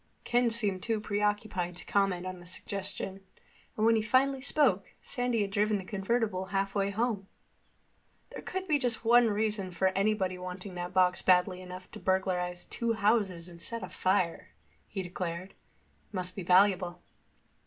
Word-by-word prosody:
Ken 245 0 +2
seemed 210 -5 +1
too 225 +1 0
preoccupied 205 -4 -1
to 180 - -9
comment 195 -3 +1
on 185 -1 -5
the 175 - -13
suggestion, 195 +1 -4 0.5
and 215 - +2
when 230 0 +5
he 220 - +2
finally 260 +4 +2
spoke, 260 -9 +1
Sandy 245 -3 -1
had 200 - -4
driven 210 +1 +2
the 190 - -6
convertible 200 0 -1
halfway 195 0 0
home. 205 -2 -1 1.0
"There - - -7
could 375 0 -4
be 300 -4 +3
just 245 -3 -1
one 240 +1 +6
reason 210 -2 0
for 180 +2 +1
anybody 195 -1 0
wanting 185 +1 -7
that 175 0 -4
box 185 -1 +3
badly 180 0 +3
enough 185 0 -9
to - - -9
burglarize 180 -2 0
two 235 -1 -1
houses 200 -5 +1
and 170 -1 -9
set 230 +1 -2
a 185 - -5
fire," 185 -2 0 0.4
he 190 - -4
declared. 180 0 -4
"It - - -36
must 180 -1 -2
be 195 - -4
valuable." 180 -1 +3
195 Hz, 165 wpm, -30 LUFS, 185-220 Hz, 1.0 s, one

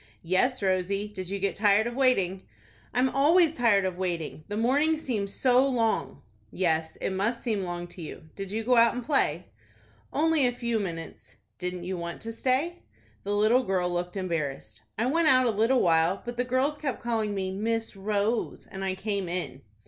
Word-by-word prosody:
"Yes, 210 +8 +1
Rosie. 190 +2 0
Did 190 -3 -7
you 200 - -2
get 200 0 -1
tired 205 +1 +4
of 240 - -3
waiting?" 195 -8 +2 0.5
"I'm 250 +2 +2
always 310 +5 +4
tired 225 -8 +3
of 185 -1 -3
waiting. 170 -4 -3
The 205 - -4
mornings 290 +7 +2
seem 215 -6 -1
so 250 +5 +3
long." 230 -4 -1 0.3
"Yes, 160 -3 0
it - - -3
must 210 +5 -1
seem 220 -5 0
long 175 -1 -4
to 175 - -10
you. 160 - -8
Did 195 -1 -6
you 220 +2 -2
go 250 +1 +3
out 230 0 +5
and 245 -1 -5
play?" 180 - +1 0.6
"Only 310 -2 +3
a 245 - -1
few 235 -2 -1
minutes." 165 -5 -6 0.2
"Didn't 180 0 -4
you 180 0 -4
want 170 0 -5
to 225 - -4
stay?" 265 +9 -1 0.4
The 205 +1 -1
little 215 +5 +4
girl 185 -6 0
looked 175 +2 -3
embarrassed. 145 - -3 0.2
"I 225 - +1
went 320 +5 +2
out 255 -2 +6
a 235 - +3
little 225 +5 +2
while, 165 +2 +2
but 240 0 -5
the 250 +1 -1
girls 265 +4 0
kept 270 -6 -3
calling 220 -3 -1
me 190 -1 -2
Miss 225 +3 -2
Rose, 210 +3 -1
and 195 0 -7
I 190 -1 -1
came 200 -2 -3
in." 175 -6 -4
210 Hz, 190 wpm, -27 LUFS, 185-245 Hz, 0.6 s, out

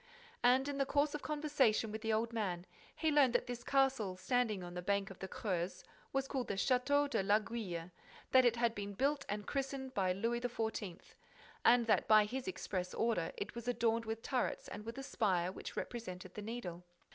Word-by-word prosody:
And, 260 +3 +4
in 285 -1 -3
the 275 - +3
course 290 +1 +2
of 300 - -3
conversation 290 -8 +1
with 220 +1 -5
the 225 0 0
old 225 +2 0
man, 185 -6 -2 0.3
he 320 -1 +1
learnt 280 -5 +5
that 245 - +2
this 245 -1 -5
castle, 265 -9 +2
standing 220 -1 0
on 175 0 -7
the 180 - -4
bank 200 +1 0
of 190 - -11
the 190 - -4
Creuse, 185 -3 -3 0.3
was 270 0 0
called 265 -3 -2
the 200 - -1
Château 275 +6 +3
de 280 - 0
l'Aiguille, 205 -4 -1 0.4
that 260 0 +7
it 240 -1 +4
had 235 -1 +2
been 205 -2 -5
built 280 +6 +1
and 205 0 -3
christened 270 -1 -3
by 185 -2 +2
Louis 230 +6 0
XIV., 220 -6 -2 0.7
and 240 0 +6
that, 220 - +3
by 215 -1 +7
his 250 +3 -4
express 185 0 -3
order, 220 -8 +1
it 200 - -4
was 235 0 -7
adorned 230 -1 +1
with 225 0 -4
turrets 255 -2 -1
and 210 - -7
with 230 - -5
a 270 - -4
spire 185 -9 +1
which - - -8
represented 185 -6 -5
the 210 - -6
Needle. 205 -6 -5
230 Hz, 200 wpm, -36 LUFS, 195-255 Hz, 0.7 s, that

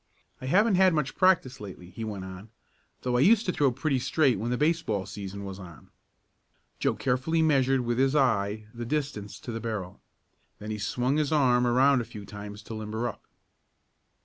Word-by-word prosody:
"I 130 - -5
haven't 205 +9 +4
had 185 -3 +5
much 150 -3 -1
practice 170 -9 +3
lately," 90 -3 -9
he 115 +5 -7
went 100 -4 -5
on, 95 +3 -9 0.5
"though 125 -1 +1
I - - +2
used 215 - +5
to 180 - +1
throw 145 -6 +2
pretty 135 +1 0
straight 130 - +2
when 115 +3 -2
the 125 - 0
baseball 150 - 0
season 100 0 -7
was 95 0 -7
on." 85 -5 -12 0.9
Joe - - +1
carefully 135 +6 +1
measured 135 -4 +3
with 120 0 -1
his 135 +2 +3
eye 110 -6 +1
the 120 0 -6
distance 125 -6 -3
to 120 - -6
the 115 - -4
barrel. 105 -6 -5 0.6
Then 105 +1 -6
he 105 - -4
swung 125 +7 0
his 150 -1 0
arm 125 -5 +3
around 130 +2 +4
a - - -5
few 105 -2 -10
times 105 +1 -9
to 115 - -8
"limber 110 +2 -3
up." 115 - -7
120 Hz, 190 wpm, -28 LUFS, 105-140 Hz, 0.9 s, had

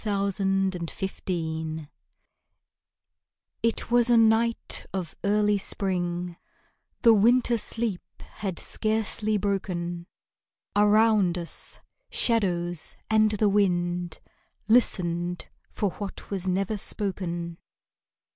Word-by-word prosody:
SARA 200 -2 0
TEASDALE 195 -1 0 0.2
WISDOM 160 -4 -3 1.7
It 230 0 0
was 240 0 +4
a 240 - +6
night 225 +1 +2
of 185 -4 -4
early 210 0 +2
spring, 175 -3 -2 0.7
The 230 -2 +8
winter 235 +3 +4
sleep 225 -3 -2 0.4
was 195 -4 -2
scarcely 215 0 0
broken; 175 -3 -2 0.7
Around 210 -3 +4
us 170 -1 -4 0.3
shadows 175 -7 +1 0.2
and 215 0 +5
the 210 0 +1
wind 175 -4 +1 0.5
Listened 175 -6 +2 0.2
for 205 -3 -1
what 200 +1 -8
was 190 -2 -2
never 195 +3 0
spoken. 175 -5 -3
195 Hz, 90 wpm, -26 LUFS, 175-215 Hz, 1.7 s, The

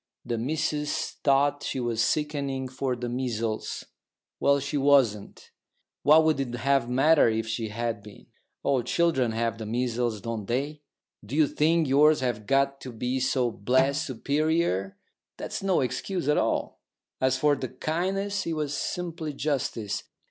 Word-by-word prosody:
The 115 -1 -2
missus 150 +3 -2
thought 140 +1 +3
she 130 - -3
was 120 -2 0
sickening 140 0 -1
for 130 0 -2
the 120 0 -4
measles." 115 -3 -3 0.6
"Well, 140 0 +3
she 140 +2 -4
wasn't. 135 -8 +2 0.5
What 155 +2 +6
would 155 -3 +2
it 125 -3 -2
have 135 0 +1
mattered 135 -2 +4
if 110 0 -2
she 110 0 -2
had 115 0 -3
been? 105 0 -14 0.4
All 135 -3 +2
children 130 -2 +1
have 115 0 -1
the 110 - -5
measles, 120 -1 -1
don't 115 -2 -5
they? 145 +5 -2 0.4
Do 110 +7 -6
you 155 0 +5
think 160 +3 +2
yours 150 +3 +5
have 120 -5 -2
got 140 0 +2
to 130 - -7
be 125 +3 -2
so 125 -1 +1
blessed 130 +7 +1
superior? 140 - 0 0.4
That's - - -5
no 195 -2 +2
excuse 175 +6 -2
at 150 - +3
all. - - -1 0.4
As 130 0 +2
for 145 +2 +3
the 130 -3 -5
kindness, 190 - -2
it 165 - -1
was 150 -2 -2
simply 165 0 -3
justice. 115 -8 -2
135 Hz, 155 wpm, -27 LUFS, 115-150 Hz, 0.6 s, What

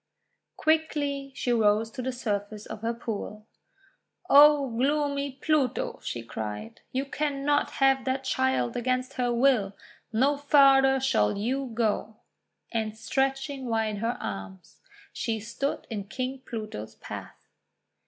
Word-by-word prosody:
Quickly 290 -3 0
she 245 -1 0
rose 220 0 +3
to 255 - -5
the 260 +1 -2
surface 210 -4 -3
of - - -8
her 230 +1 0
pool. 215 -2 -5 0.9
:<O 290 -1 +8
gloomy 280 +1 0
Pluto," 310 - 0
she 120 - -4
cried, 110 -1 -6
:<y°u 275 +1 -2
cannot 290 -1 0
have 270 -1 +4
that 265 0 -1
child 130 - 0
against 255 +2 -1
her 250 -2 0
will! 235 -5 +2 0.4
No 270 +6 +2
farther 275 -2 +5
shall 105 - +2
you 260 +6 -1
go." 220 -1 0 0.6
And 220 -2 -2
stretching 270 +1 -1
wide 220 -2 0
her 230 +3 -1
arms, 95 -1 -7 0.3
she 225 -1 -2
stood 235 +6 -3
in 205 -3 -3
King 255 +5 -4
Pluto's 215 - -6
path. - - -8
255 Hz, 125 wpm, -27 LUFS, 215-275 Hz, 0.9 s, <O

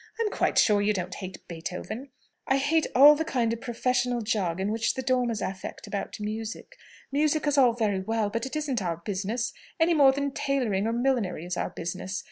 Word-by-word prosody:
"I'm 440 -2 0
quite - - 0
sure 205 -2 +5
you 210 +1 +2
don't 185 -2 -3
hate 185 -2 -8
Beethoven!" 180 +10 -6 0.4
"I 270 - +3
hate 305 +4 +2
all 285 +4 +10
the 305 +2 -1
kind 245 -8 0
of 230 - -6
professional 245 0 0
jargon 195 -3 -1
which 225 +1 0
the 260 - -3
Dormers 245 -4 0
affect 190 0 -6
about 200 - -5
music. 220 - -5 0.4
Music 300 +2 +1
is 290 -1 +2
all 255 -4 +5
very 215 -5 0
well, 215 +1 -1
but 230 +3 -2
it 265 - -7
isn't 285 -7 -1
our 170 -3 -2
business, 205 +7 -3 0.3
any 330 +1 +4
more 280 -4 +6
than 280 +1 -2
tailoring 245 -8 0
or 230 - 0
millinery 235 -9 0
is 180 0 -3
our - - -2
business. 185 +3 -4
230 Hz, 195 wpm, -27 LUFS, 195-270 Hz, 0.4 s, all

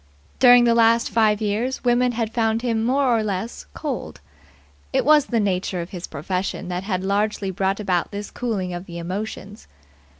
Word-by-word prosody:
During 245 -1 +7
the 235 -1 +4
last 230 0 +3
five 215 -2 +2
years 220 +6 -1
women 245 0 +2
had 225 -1 -2
found 225 0 0
him 225 -2 0
more 255 0 +2
or 225 - +1
less 205 - -4
cold. - - -5 0.7
It - - +1
was 300 -1 +5
the 235 - 0
nature 185 -2 -1
of 170 +1 -6
his 180 -2 -6
profession 180 +4 -4
that 180 +1 -3
had 185 -3 -2
largely 200 0 0
brought 190 +2 -1
about 185 -4 0
this 205 0 -6
cooling 200 -7 -3
of 175 +2 -7
the 170 -1 -8
emotions. 200 +3 -6
210 Hz, 175 wpm, -22 LUFS, 190-235 Hz, 0.7 s, During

